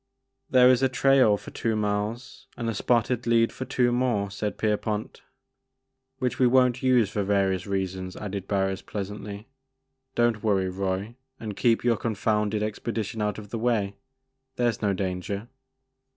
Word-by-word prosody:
'< 130 0 -54
There 125 -1 +6
is 130 0 +3
a 135 - +3
trail 130 -4 +4
for - - -11
two 115 -1 -1
miles 105 +3 -3
and 115 - -3
a 115 - 0
spotted 120 +2 +1
lead 115 0 +3
for 130 - -5
two 125 -2 +1
more," 120 -5 0
said 105 +1 -3
Pierpont. 105 0 -2 1.0
"Which 130 -2 -2
we 130 - +5
won't 125 0 +3
use 125 -6 +3
for 105 - -1
various 95 -2 +1
reasons," 95 -1 -3
added 100 -2 -5
Barris 95 -1 0
pleasantly; 105 +1 -6 0.7
don't 120 -3 +2
worry, 95 -4 +1
Roy, 95 +3 -2 0.3
and 105 -3 -5
keep 115 +1 +2
your 120 -2 +3
confounded 105 -1 0
expedition 110 +1 -3
out 105 -1 -1
of 105 -1 -10
the 115 - -3
way; 110 -4 0 0.6
there 120 -2 +2
*s 110 - -4
no 105 -2 +2
danger." 100 +4 -3
105 Hz, 160 wpm, -26 LUFS, 100-120 Hz, 1.0 s, There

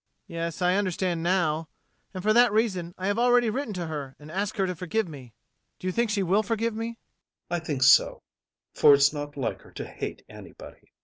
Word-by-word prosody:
Yes, 170 +1 -4
I 180 +2 +3
understand 185 -3 -1
now 165 -3 0 0.4
And 185 -2 -7
for 215 +1 +3
that 240 0 +5
reason 190 -6 0
I 185 - -5
have 205 +3 0
already 245 -1 +4
written 265 0 -3
to 175 -1 -3
her 145 -4 -6
and 150 +1 -12
asked 200 +5 -3
her 195 - +2
to 180 -1 -3
forgive 185 +5 -2
me 130 -8 -11 0.4
Do - - -11
you 185 - 0
think 235 +2 +1
she 205 -2 0
will 190 +4 +3
forgive 225 +2 -1
me? 230 +1 -5 0.5
ADOLPHE. 175 -1 -1
I - - -19
think 145 -5 -1
so, - - +5 0.5
for 145 - +7
it's 140 +2 +4
not 145 -1 -6
like 130 - -3
her - - -17
to - - -6
hate - - -7
anybody. - - -13
185 Hz, 210 wpm, -26 LUFS, 160-215 Hz, 0.5 s, for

